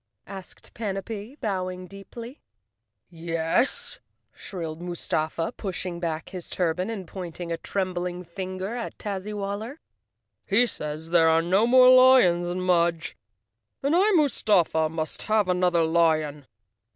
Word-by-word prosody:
asked 190 -2 -11
Panapee 210 +4 -5
bow¬ 185 -4 -1
ing 185 0 -8
deeply. 230 - -10 0.7
"Yes," 165 +7 0 0.3
shrilled 165 -4 -6
Mustafa, 165 0 -2
pushing 185 -3 -4
back 165 -2 -3
his 180 -3 -7
turban 180 +2 -1
and 200 -6 -5
pointing 175 -2 -7
a 165 - -1
trembling 180 -1 -3
finger 185 +2 -5
at 240 -1 -5
Tazzywaller. 205 +4 -4 0.7
"He 220 +5 +5
says 155 -5 -6
there 165 -2 +5
are 165 0 +3
no 190 +6 +3
more 255 +1 +7
lions 255 -10 +6
in 180 +1 -3
Mudge 170 -2 +1 0.7
and 285 +4 +2
I, 390 +4 +4
Mustafa, 200 - +2
must 160 0 -3
have 215 -2 +1
another 180 -2 +2
lion." 155 -3 +1
185 Hz, 125 wpm, -25 LUFS, 170-205 Hz, 0.7 s, more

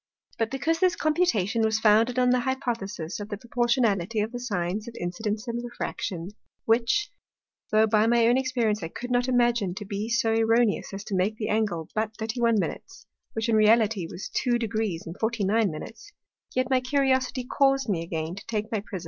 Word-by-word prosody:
But 225 -1 +1
because 315 +6 -1
this 370 -2 +3
Computation 275 - +1
was 220 0 +2
founded 220 +3 +4
on 250 -1 +4
the 250 - +3
Hypothesis 230 - -3
of 205 0 -6
the 205 - -4
proportionality 235 -4 0
of 215 +2 -2
the 245 - -5
Sines 205 -3 -2
of 235 - -8
Incidence 210 +5 -3
and 235 0 -3
Refraction, 190 -7 -4 0.4
which, 235 - +2 0.6
tho' 215 +1 +4
by 215 0 +3
my 235 0 +4
own 240 +1 +4
Experience 245 -5 0
I 165 - -3
could 245 +9 -7
not 245 +1 +2
imagine 240 -7 +2
to 210 - -6
be 205 +3 -4
so 230 -1 +2
erroneous 225 0 +2
as 195 0 -6
to 200 - -4
make 195 +4 0
that 215 - -3
Angle 205 -7 0
but 215 0 -2
31', 225 -5 0 0.6
which 225 +1 -2
in 230 - +2
reality 215 -4 +4
was 185 - -7
2° 225 -7 0 0.2
49'; 215 -6 0 0.7
yet 255 0 +1
my 260 - +4
Curiosity 260 -1 +1
caus'd 270 +1 +2
me 185 -6 0
again 165 -1 -4
to 200 - -9
take 215 -1 -3
my 220 - 0
Prism. 195 -3 -6
225 Hz, 175 wpm, -26 LUFS, 205-245 Hz, 0.7 s, founded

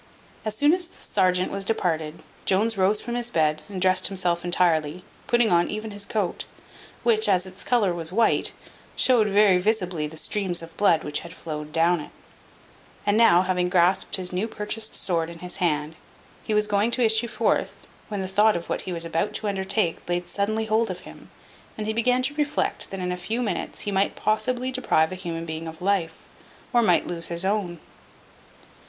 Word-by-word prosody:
As 215 -1 -2
soon 290 +7 +4
as 360 -1 -1
the - - -18
serjeant 185 -2 +1
was 195 0 -1
departed, 165 -6 -2 0.2
Jones 215 +4 +2
rose 195 +2 +2
from 240 - -5
his 240 0 -1
bed, 155 -6 +1
and 195 -2 -5
dressed 185 0 +3
himself 180 -3 -1
entirely, 175 -2 +1 0.2
putting 240 -3 +3
on 175 0 +3
even 215 +1 -4
his 205 0 -4
coat, 205 -5 -2 0.6
which, 220 -2 +3
as 185 -1 +2
its 185 +1 -3
colour 215 -7 +2
was 165 -1 -4
white, 225 +4 +2 0.4
showed 240 -5 +4
very 200 -2 +4
visibly 180 -6 0
the 160 +1 -11
streams 180 -2 -1
of 165 0 -12
blood 170 -5 +3
which 150 - -1
had 170 +1 -10
flowed 150 -1 -6
down 170 +2 +3
it; 150 - -8 1.0
and 205 - +2
now, 185 -6 +6
having 180 -1 0
grasped 180 +3 +2
his 185 -2 -1
new 190 +5 -1
purchased 215 0 -3
sword 165 -3 0
in 170 - -9
his 180 +1 -6
hand, 155 -2 0 0.5
he 215 - -1
was 210 0 +3
going 210 +2 +1
to 240 0 +1
issue 220 +1 +3
forth, 230 0 -1 0.2
when 205 -2 -4
the 190 - -3
thought 210 +3 +3
of 170 - -5
what - - -1
he 185 - -6
was 170 -1 -3
about 165 +6 -1
to 215 - -2
undertake 195 -3 -1
laid 175 0 -1
suddenly 215 +2 -1
hold 220 +1 +1
of 185 - -5
him, - - -13 0.5
and 215 - -3
he 220 - -1
began 250 +3 +2
to 275 +3 0
reflect 295 -1 -1
that 195 - -6
in 180 0 -2
a 180 - -3
few 220 +7 -3
minutes 235 -4 -3
he 205 - -3
might 195 0 +1
possibly 250 +4 0
deprive 160 -11 +1
a 185 0 -7
human 165 -2 -4
being 160 0 -5
of 160 0 -8
life, 180 -4 -1 0.5
or 240 - +5
might 180 -7 +3
lose 170 -1 -4
his 170 +2 -2
own. 190 -4 -1
190 Hz, 195 wpm, -25 LUFS, 175-215 Hz, 1.0 s, now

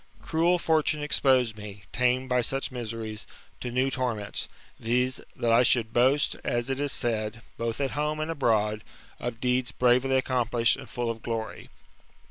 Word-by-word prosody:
Cruel 170 +2 +2
fortune 155 -2 +1
exposed 130 -5 +2
me, 105 -1 -9
tamed 125 +1 +1
by 125 -1 +2
such 135 +4 -1
miseries, 115 -3 -5 0.3
to 125 - -4
new 130 +3 +1
torments: 120 -6 -2 0.3
viz. 125 +3 0
that 115 - 0
I 115 +1 +6
should 115 -2 +2
boast, 135 +4 +3
as 120 +2 -1
it 135 - -2
is 145 -1 +1
said, 115 -1 0
both 115 +1 -3
at 135 -2 0
home 150 +1 -1
and 155 +1 -2
abroad, 110 -7 +1 0.4
of 120 -1 -4
deeds 125 0 +1
bravely 125 +1 +3
accomplished, 120 -3 +2
and - - -11
full 120 -1 -2
of 115 -1 -8
glory. 115 -1 -5
125 Hz, 160 wpm, -27 LUFS, 115-135 Hz, 0.4 s, I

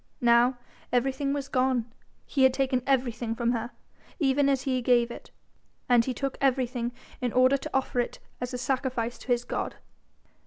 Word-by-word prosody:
Now 240 +1 +4 0.3
everything 270 +3 +1
was 280 -1 -2
gone, 255 -3 +1 0.4
he 275 - -1
had 260 -1 +5
taken 265 -2 +1
everything 240 -4 0
from 235 0 +1
her, 235 0 -2 0.5
even 280 -2 +2
as 270 -1 +1
he 260 -2 0
gave 240 -1 +3
it; - - -10 0.6
and 245 -2 +5
he 260 - -1
took 275 +1 -3
everything 250 -3 +1 0.3
in 250 -2 0
order 255 +3 +5
to 310 - -7
offer 265 -2 0
it 240 - -1 0.2
as 250 0 -3
a 250 - -3
sacrifice 250 -2 -2
to - - -13
his 245 -1 +2
God. - - -3
255 Hz, 170 wpm, -27 LUFS, 240-270 Hz, 0.6 s, had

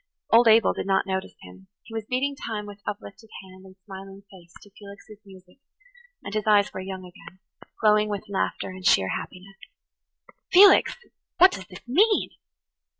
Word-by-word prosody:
Old 235 +1 +6
Abel 225 0 +5
did - - -6
not 195 -1 +1
notice 190 -1 -4
him; 95 +1 -15 0.2
he 225 - -14
was 220 -1 -5
beating 275 +3 -1
time 220 -6 -6
with 205 0 -12
uplifted 210 +2 -8
hand 185 0 -16
and 185 - -17
smiling 195 0 -11
face 175 -3 -17
to 205 - -19
Felix's 200 +1 -14
music, 185 +2 -18 0.6
and - - -8
his 215 0 -3
eyes 205 -1 +3
were - - -6
young 190 0 -7
again, 180 +1 -15 0.4
glowing 210 0 +3
with 205 +1 -5
laughter 200 -1 -3
and 185 0 -11
sheer 95 - +3
happiness. 195 - -7 0.9
"Felix! 385 +1 +6 0.4
what 370 +1 +7
does 190 - -8
this 185 +5 -14
mean?" 410 - +2
200 Hz, 165 wpm, -24 LUFS, 190-220 Hz, 0.9 s, what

